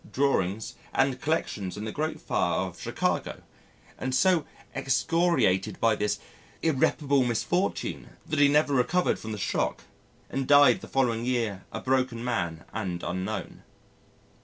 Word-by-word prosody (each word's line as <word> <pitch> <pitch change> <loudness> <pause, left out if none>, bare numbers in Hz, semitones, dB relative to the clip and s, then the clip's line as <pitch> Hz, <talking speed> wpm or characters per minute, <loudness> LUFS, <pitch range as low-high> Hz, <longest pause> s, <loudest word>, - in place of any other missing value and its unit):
drawings, 110 -7 0 0.2
and 135 -1 +2
collections 105 - -2
in 105 - -5
the 110 - -3
great 155 +5 -2
fire - - 0
of - - -6
Chicago, - - -2 0.6
and - - -3
was 130 0 +1
so 180 -5 +3 0.3
excoriated 135 - +1
by 115 -1 +3
this 105 0 0 0.5
irreparable 140 -2 +2
misfortune 150 - -1 0.2
that 155 -3 -1
he 145 - +7
never 145 0 +3
recovered 160 +8 +2
from 110 - -6
the 105 - -4
shock, 100 - -1 0.4
and 135 -1 -3
died 145 -4 +6
the - - -9
following 120 -4 +1
year 115 -6 -1
a - - -4
broken 130 -3 0
man 85 -9 -2
and 90 -2 -3
unknown. 95 +4 -4
130 Hz, 140 wpm, -27 LUFS, 110-145 Hz, 0.6 s, he